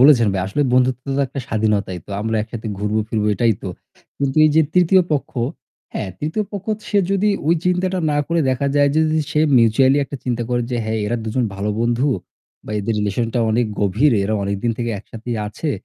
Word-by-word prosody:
বলেছেন 130 Hz, -4 st, +7 dB
ভাই। 95 Hz, -, -1 dB
আসলে 145 Hz, +9 st, 0 dB
বন্ধুত্ব 130 Hz, 0 st, +2 dB
তো -, -, +2 dB
একটা 135 Hz, +1 st, -5 dB
স্বাধীনতাই। 105 Hz, -5 st, 0 dB
তো -, -, -12 dB
আমরা 110 Hz, +1 st, -1 dB
একসাথে 110 Hz, +1 st, -7 dB
ঘুরবো 105 Hz, +1 st, 0 dB
ফিরবো 105 Hz, -1 st, 0 dB
এটাই 115 Hz, 0 st, +3 dB
তো। 95 Hz, -, -4 dB, 0.5 s
কিন্তু 140 Hz, 0 st, -1 dB
এই 155 Hz, -, +5 dB
যে 160 Hz, -, +7 dB
৩য় 180 Hz, +1 st, +5 dB
পক্ষ 145 Hz, -, -1 dB, 0.6 s
হ্যাঁ 100 Hz, -, -3 dB
৩য় 160 Hz, +8 st, -2 dB
পক্ষ 200 Hz, -1 st, -6 dB, 0.2 s
সে 205 Hz, -, +2 dB
যদি 195 Hz, +1 st, +2 dB, 0.4 s
চিন্তাটা 180 Hz, +1 st, +1 dB
না 145 Hz, -, +1 dB
করে 165 Hz, 0 st, +1 dB
দেখা 130 Hz, +2 st, 0 dB
যায় 145 Hz, 0 st, +5 dB
যে 155 Hz, -, +4 dB
যদি 155 Hz, 0 st, +1 dB
সে 150 Hz, -, +2 dB, 0.2 s
mutually 130 Hz, +4 st, +4 dB
একটা 140 Hz, -, -7 dB
চিন্তা 120 Hz, -2 st, -1 dB
করে 120 Hz, -1 st, +1 dB
যে, 125 Hz, -, -1 dB
"হ্যাঁ, 110 Hz, 0 st, -1 dB
এরা 120 Hz, -, 0 dB
দুজন 120 Hz, +3 st, 0 dB
ভালো 100 Hz, +2 st, -2 dB
বন্ধু 120 Hz, +4 st, +1 dB, 0.6 s
বা -, -, -9 dB
এদের 105 Hz, +2 st, -1 dB
রিলেশন 105 Hz, +3 st, 0 dB
টা -, -, +2 dB
অনেক 115 Hz, +2 st, +2 dB
গভীর। 110 Hz, +8 st, +3 dB
এরা 110 Hz, +2 st, 0 dB
অনেকদিন 100 Hz, +4 st, -1 dB
থেকে 120 Hz, -1 st, -1 dB
একসাথেই 115 Hz, +3 st, -6 dB
আছে। 145 Hz, +9 st, -3 dB
120 Hz, 200 wpm, -20 LUFS, 110-145 Hz, 0.6 s, বলেছেন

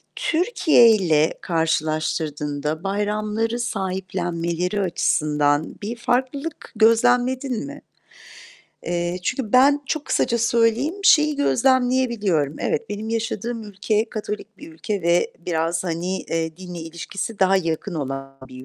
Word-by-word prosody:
Türkiye'yle 230 Hz, -, +3 dB
karşılaştırdığında 155 Hz, -2 st, -1 dB
bayramları 210 Hz, +3 st, -1 dB
sahiplenmeleri 185 Hz, -3 st, -2 dB
açısından 150 Hz, -4 st, +1 dB
bir 225 Hz, +4 st, -3 dB
farklılık 260 Hz, +6 st, -2 dB
gözlemledin 245 Hz, +3 st, +2 dB
mi? 290 Hz, +1 st, -9 dB, 1.1 s
Eee, 175 Hz, +1 st, -1 dB
çünkü 245 Hz, +3 st, -2 dB
ben 280 Hz, +3 st, +5 dB
çok 305 Hz, +1 st, -2 dB
kısaca 235 Hz, -, +1 dB
söyleyeyim, 235 Hz, +6 st, +2 dB
şeyi 300 Hz, -4 st, +5 dB
gözlemleyebiliyorum: 245 Hz, -, +1 dB
Evet, 225 Hz, 0 st, -2 dB
benim 210 Hz, +2 st, -4 dB
yaşadığım 230 Hz, 0 st, -3 dB
ülke 210 Hz, +2 st, -1 dB
Katolik 210 Hz, -1 st, -6 dB
bir 165 Hz, -, -11 dB
ülke 195 Hz, +4 st, -4 dB
ve 170 Hz, +1 st, +2 dB
biraz, 165 Hz, 0 st, -1 dB
hani, 175 Hz, +2 st, -2 dB
eee, 160 Hz, 0 st, -3 dB
dinle 180 Hz, -2 st, -8 dB
ilişkisi 170 Hz, +6 st, -6 dB
daha 190 Hz, 0 st, +4 dB
yakın 170 Hz, +1 st, -2 dB
olan 135 Hz, -2 st, -5 dB
bir 130 Hz, 0 st, -11 dB
200 Hz, 110 wpm, -22 LUFS, 165-235 Hz, 1.1 s, ben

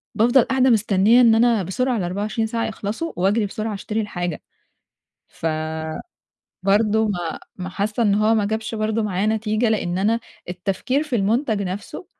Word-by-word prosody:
بافضل 240 Hz, +4 st, +5 dB
قاعدة 265 Hz, 0 st, +2 dB
مستنية 220 Hz, +1 st, +4 dB
إن 230 Hz, -2 st, +6 dB
أنا 230 Hz, -3 st, +3 dB
بسرعة 245 Hz, +7 st, -1 dB
ال24 205 Hz, +4 st, -2 dB
ساعة 230 Hz, +1 st, -2 dB
يخلصوا، 220 Hz, +9 st, -4 dB
وأجري 200 Hz, +4 st, +1 dB
بسرعة 215 Hz, +2 st, -4 dB
أشتري 210 Hz, +2 st, -3 dB
الحاجة. 175 Hz, -6 st, -4 dB, 0.9 s
فبرضه 160 Hz, -, -4 dB, 0.9 s
ما 175 Hz, -5 st, -3 dB, 0.2 s
ما 185 Hz, 0 st, -5 dB
حاسة 210 Hz, +5 st, -2 dB
إن 205 Hz, -3 st, +3 dB
هو 215 Hz, +2 st, +3 dB
ما 215 Hz, -2 st, +2 dB
جابش 220 Hz, +2 st, -3 dB
برضه 220 Hz, +1 st, 0 dB
معايا 200 Hz, -1 st, -1 dB
نتيجة، 220 Hz, +1 st, +1 dB
لأن 185 Hz, -5 st, -1 dB
أنا 220 Hz, +4 st, +1 dB, 0.3 s
التفكير 195 Hz, +10 st, -1 dB
في 300 Hz, -6 st, -2 dB
المنتج 220 Hz, +1 st, +1 dB
نفسه 195 Hz, -, -6 dB
215 Hz, 150 wpm, -22 LUFS, 190-230 Hz, 0.9 s, إن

